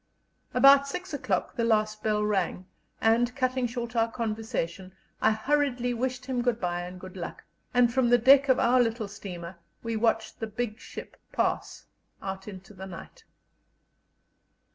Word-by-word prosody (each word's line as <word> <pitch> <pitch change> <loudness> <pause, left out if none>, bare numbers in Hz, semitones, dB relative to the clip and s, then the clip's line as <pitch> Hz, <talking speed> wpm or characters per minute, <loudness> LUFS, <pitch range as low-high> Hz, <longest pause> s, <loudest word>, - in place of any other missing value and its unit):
About 275 0 +7
six 360 +4 -5
o'clock 285 - -1
the 235 - 0
last 215 -1 +1
bell 210 -1 +1
rang, 190 -3 0 0.3
and, 235 +3 +3
cutting 255 -1 0
short 240 0 -5
our 230 0 +2
conversation, 215 -5 -3 0.3
I - - +5
hurriedly 245 +1 +1
wished 255 +1 -2
him 255 -2 -1
good 240 -2 0
bye 175 -2 -1
and 180 +1 -8
good 185 0 -10
luck, 175 -2 -7 0.3
and 245 -1 +4
from 260 -2 +3
the 245 - +6
deck 270 +3 +6
of 260 - +5
our 250 +1 +4
little 230 -2 -1
steamer 180 -3 -8 0.2
we 230 -1 -2
watched 225 0 0
the 225 - -3
big 220 +1 -4
ship - - -9
pass - - -1 0.3
out 190 0 -6
into 195 0 -10
the 190 0 -8
night. 175 -3 -11
230 Hz, 160 wpm, -28 LUFS, 200-250 Hz, 0.3 s, About